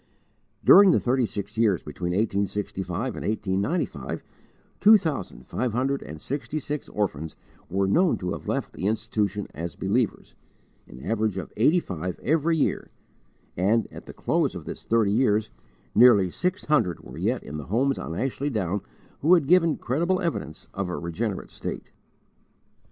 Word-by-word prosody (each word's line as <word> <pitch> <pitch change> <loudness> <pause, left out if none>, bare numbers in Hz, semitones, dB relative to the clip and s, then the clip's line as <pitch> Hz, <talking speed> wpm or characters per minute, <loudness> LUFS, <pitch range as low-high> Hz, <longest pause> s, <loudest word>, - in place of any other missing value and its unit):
During 200 -1 +9
the - - +5
thirty 125 -1 +1 0.3
years 105 -6 +2
between 85 +4 -4
1865 100 +1 -1
and - - -5
1895, 105 - -2 0.6
two 215 +1 +8
thousand 145 - -4
five 125 -3 -2
hundred 135 +3 0
and 75 +2 -8
sixty 140 - -4
six 150 0 -4
orphans 80 -7 -2 0.3
were 95 +2 +1
known 175 - +3
to 90 -1 -3
have - - -6
left - - -2
the 95 - -2
institution 105 -2 -1
as 85 +3 -5
believers, 110 +4 -1 0.5
an 65 - -12
average 110 -3 0
of 90 - -6
eighty 150 +11 +4
five 90 - -5
every 160 +3 +2
year; 150 - 0 0.7
and, 105 +6 +2
at - - -10
the - - -8
close - - 0
of - - -7
this - - -7
thirty 110 -3 +2
years, 110 -2 +2 0.4
nearly 105 -7 +6
six 185 - -2
hundred 120 - +1
were - - -10
yet - - 0
in 75 - -6
the 75 - -6
homes 130 +8 +1
on 80 - -5
Ashley 135 +3 -1
Down 100 -5 -1 0.4
who 165 +5 +6
had 165 -5 +2
given 165 0 +4
credible 170 +9 0
evidence 165 - -4
of 100 -2 -3
a 90 - -3
regenerate 95 +4 -3
state. - - -6
110 Hz, 155 wpm, -25 LUFS, 95-140 Hz, 0.7 s, During